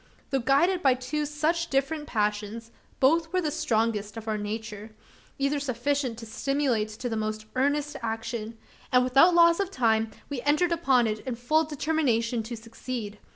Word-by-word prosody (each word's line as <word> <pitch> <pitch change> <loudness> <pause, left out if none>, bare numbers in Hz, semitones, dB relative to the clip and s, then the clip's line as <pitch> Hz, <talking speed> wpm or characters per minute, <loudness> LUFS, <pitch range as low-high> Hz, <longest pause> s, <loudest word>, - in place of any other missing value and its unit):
Though 270 - +2
guided 310 +9 +3
by 265 -5 +4
two 285 +4 -3
such 315 +3 0
different 295 +3 -1
passions, 210 +1 -2 0.3
both 325 +4 +3
were 370 - 0
of 360 - 0
the 300 - 0
strongest 220 -6 -1
of 225 0 -8
our 215 - 0
nature 215 0 -6 0.4
either 275 +1 0
sufficient 265 -1 -1
to 230 - -8
stimulate 260 -2 0
to 220 +4 -6
the 225 - -2
most 215 0 -3
earnest 285 +3 0
action; 225 0 -4 0.3
and 250 -1 +5
without 275 +8 +5
loss 335 0 +6
of 395 -2 0
time, 225 - +1 0.2
we 280 -4 -4
entered 305 +6 +2
upon 275 -8 +3
it 215 -1 -1
in 250 +2 -4
full 305 +7 +2
determination 270 -7 0
to 230 +2 -6
succeed. 225 -2 -6
255 Hz, 170 wpm, -27 LUFS, 225-295 Hz, 0.4 s, loss